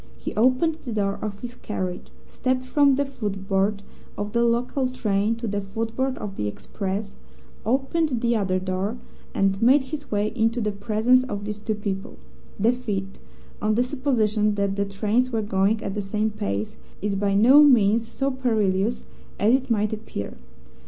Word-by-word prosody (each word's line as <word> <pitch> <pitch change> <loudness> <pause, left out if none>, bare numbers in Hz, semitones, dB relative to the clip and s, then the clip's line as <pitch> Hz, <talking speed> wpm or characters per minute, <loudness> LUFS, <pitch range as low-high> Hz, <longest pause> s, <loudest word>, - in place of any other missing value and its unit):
He - - -5
opened 255 +8 +2
the 245 - -5
door 200 -2 -1
of 205 -1 -5
his 245 -1 -6
carriage, 185 -6 -4 0.2
stepped 255 0 -1
from 280 +1 +4
the 285 +1 +1
footboard 200 -4 -1 0.3
of 205 0 -3
the 235 0 +3
local 245 +3 +1
train 215 -3 0
to 230 +1 -6
the 205 0 -1
footboard 225 +6 -2
of 195 -2 -6
the 105 - -1
express, 195 - -4 0.5
opened 270 +2 +1
the 235 0 +2
other 190 -4 +1
door, 185 +4 -2 0.4
and 195 0 +1
made 260 +4 +5
his 290 +2 -7
way 210 0 0
into 230 0 +1
the 210 -2 0
presence 220 +5 +2
of 205 -5 -5
these 210 0 -4
two 215 +1 -2
people. 200 -2 -4 0.4
The 220 +4 +4
feat 200 -6 -4 0.4
(on 215 0 +2
the 245 - +3
supposition 225 -6 +1
that 200 -1 0
the 200 0 0
trains 210 +5 0
were 225 -3 -1
going 205 +2 +1
at 195 - -3
the 210 - -2
same 210 +2 -1
pace) 110 - -3 0.3
is 205 -1 0
by 200 0 +1
no 250 +8 +8
means 230 -5 +5
so 270 +4 -1
perilous 220 -4 0 0.3
as 215 +4 +4
it 260 0 +1
might 215 -2 +1
appear. 215 - -6
215 Hz, 170 wpm, -24 LUFS, 200-250 Hz, 0.5 s, no